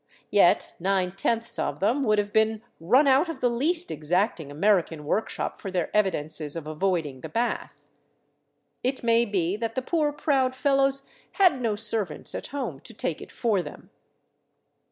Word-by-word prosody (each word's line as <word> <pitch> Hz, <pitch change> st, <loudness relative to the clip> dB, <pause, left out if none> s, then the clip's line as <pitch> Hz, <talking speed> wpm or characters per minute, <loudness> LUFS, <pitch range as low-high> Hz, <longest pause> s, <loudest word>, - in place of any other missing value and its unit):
Yet -, -, +4 dB
nine 185 Hz, 0 st, 0 dB
tenths 230 Hz, +4 st, -2 dB
of 145 Hz, -, -2 dB
them 230 Hz, -, +1 dB
would 215 Hz, -2 st, +3 dB
have 205 Hz, 0 st, -1 dB
been 220 Hz, 0 st, +2 dB, 0.2 s
run 245 Hz, -, +4 dB
out 275 Hz, +5 st, +4 dB
of 330 Hz, -, -5 dB
the 245 Hz, -, +2 dB
least 325 Hz, +9 st, 0 dB
exacting 165 Hz, +1 st, -1 dB
American 165 Hz, -1 st, +1 dB
workshop 210 Hz, +9 st, -2 dB
for 195 Hz, -, -5 dB
their 180 Hz, 0 st, -2 dB
evidences 155 Hz, -7 st, 0 dB
of 165 Hz, -3 st, -5 dB
avoiding 155 Hz, -4 st, -2 dB
the 160 Hz, -, -7 dB
bath. 235 Hz, +9 st, -2 dB, 1.0 s
It 260 Hz, +1 st, -1 dB
may 230 Hz, 0 st, +4 dB
be 185 Hz, -4 st, 0 dB
that 225 Hz, 0 st, -3 dB
the 260 Hz, -, -1 dB
poor, 305 Hz, 0 st, +1 dB
proud 265 Hz, -3 st, +1 dB
fellows 275 Hz, 0 st, +2 dB, 0.3 s
had 360 Hz, -10 st, +4 dB
no 225 Hz, -3 st, 0 dB
servants 210 Hz, -4 st, 0 dB
at -, -, -5 dB
home 250 Hz, -, -4 dB
to 225 Hz, -, -11 dB
take 170 Hz, -6 st, -3 dB
it -, -, -10 dB
for 215 Hz, -6 st, 0 dB
them. -, -, -11 dB
215 Hz, 165 wpm, -26 LUFS, 175-255 Hz, 1.0 s, Yet